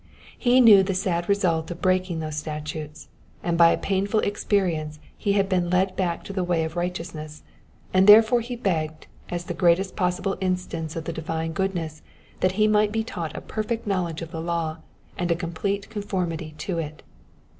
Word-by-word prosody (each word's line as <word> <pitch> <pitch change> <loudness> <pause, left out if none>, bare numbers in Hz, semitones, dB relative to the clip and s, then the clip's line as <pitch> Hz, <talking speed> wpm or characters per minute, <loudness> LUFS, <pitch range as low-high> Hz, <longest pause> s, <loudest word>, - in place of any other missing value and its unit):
He 250 0 +4
knew 215 -5 +9
the 190 0 -1
sad 175 -2 -1
result 170 -5 +1
of 175 -1 -6
breaking 185 -2 +1
those 155 -1 -4
statutes, 150 0 -6 0.4
and 170 -1 0
by 170 0 +7
a - - +2
painful 200 +2 0
experience 175 -7 0 0.2
he 200 - 0
had 200 -1 +2
been 180 -2 +1
led 185 +1 +2
back 175 -3 -1
to 195 - -7
the 190 -2 -1
way 175 -2 +1
of 160 +1 -5
righteousness; 165 -3 -5 0.5
and 190 +1 +5
therefore 225 +3 +8
he 245 +2 -5
begged 160 -9 -2 0.2
as 175 0 -3
the - - -4
greatest 180 +1 +2
possible 185 +1 -1
instance 180 -3 -2
of 165 - -3
the 170 - -4
divine 160 0 -3
goodness 170 -4 -2 0.4
that 185 0 +2
he 215 +2 +3
might 210 0 +3
be 220 +1 0
taught 170 -9 -5
a - - -5
perfect 225 +1 -3
knowledge 175 -5 -1
of 165 - -9
the 160 -2 -4
law, 165 -2 -2 0.4
and 175 0 0
a 170 - +3
complete 185 +4 -3
conformity 175 -7 -3
to 175 -4 -3
it. 155 -2 -6
180 Hz, 185 wpm, -25 LUFS, 165-195 Hz, 0.5 s, knew